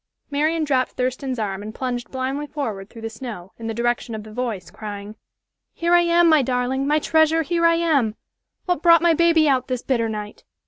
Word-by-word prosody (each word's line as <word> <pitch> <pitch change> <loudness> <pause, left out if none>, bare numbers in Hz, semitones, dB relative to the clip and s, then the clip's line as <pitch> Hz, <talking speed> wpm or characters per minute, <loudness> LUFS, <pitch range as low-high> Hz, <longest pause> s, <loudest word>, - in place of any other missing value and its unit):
Marian 310 +3 +1
dropped 265 -4 0
Thurston's 255 +1 -2
arm 200 -3 -3
and 215 +1 -8
plunged 245 -2 -3
blindly 270 +3 -3
forward 220 -10 -5
through 225 -1 -12
the 225 - -3
snow, 220 -6 -8
in 225 - -5
the 225 - -2
direction 240 0 -1
of 215 - -6
the 215 0 -12
voice, 220 -8 -4
crying, 205 0 -8 0.6
"Here 340 +1 0
I 350 - +7
am, 340 0 +4
my 310 -3 +5
darling, 255 +2 -1
my 300 +1 +3
treasure 315 +1 +3
here 335 +1 +2
I 335 - +4
am. 290 -10 +1 0.5
What 355 -5 0
brought 335 -1 +6
my 340 -1 +5
baby 330 -1 +4
out 260 -2 +2
this 255 -2 -3
bitter 235 -4 0
night?" 210 -1 -6
260 Hz, 200 wpm, -22 LUFS, 225-315 Hz, 0.6 s, I